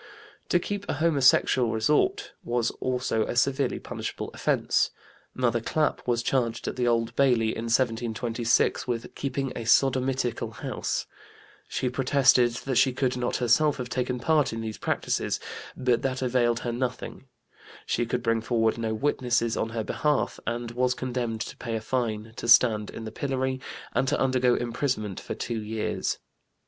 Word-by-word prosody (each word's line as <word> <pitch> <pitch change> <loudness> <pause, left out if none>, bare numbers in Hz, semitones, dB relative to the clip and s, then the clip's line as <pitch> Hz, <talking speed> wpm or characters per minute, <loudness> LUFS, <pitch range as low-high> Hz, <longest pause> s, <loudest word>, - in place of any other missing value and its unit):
To - - +4
keep 205 +3 -4
a - - +1
homosexual 140 -5 +3
resort 150 - +1
was 120 -1 0
also 125 -3 0
a - - -3
severely 135 +3 +1
punishable - - -5
offense. - - +1 0.5
Mother 120 -2 +1
Clap 150 +4 -1
was 120 -1 +1
charged 120 -4 0
at - - -2
the 125 -1 0
Old 115 0 +1
Bailey 125 -5 +3
in 115 +1 -3
1726 115 0 +1
with 120 -2 -3
"keeping 135 -1 -3
a - - -5
sodomitical 125 -2 +1
house"; - - -3 0.6
she 130 - -2
protested 130 -1 +4 0.2
that 135 -3 0
she 130 - +4
could 125 -1 0
not 125 -1 -1
herself 140 +5 +3
have 125 -2 -5
taken 125 0 -1
part 155 +2 +2
in 115 0 -4
these 110 -1 -5
practices, - - -1 0.4
but 125 -2 +2
that 130 0 -2
availed 120 -2 +2
her 120 - -2
nothing; 125 +2 -4 0.6
she 120 - 0
could 120 0 -2
bring 115 -1 +1
forward 115 -1 +1
no 110 -1 -1
witnesses 120 -3 +1
on 110 - -1
her 115 -1 -3
behalf 150 +5 0
and 120 0 -2
was 125 +1 +1
condemned 120 -4 -3
to - - -5
pay 115 -2 -4
a - - -1
fine, 110 -2 -2
to - - -5
stand 115 -3 +5
in 115 - -7
the 110 - -6
pillory, 130 +1 -2 0.3
and 135 - +1
to - - +1
undergo 130 -2 +3
imprisonment 120 -5 -2
for - - -6
two 115 -2 -3
years. 110 0 -2
120 Hz, 160 wpm, -27 LUFS, 115-130 Hz, 0.6 s, stand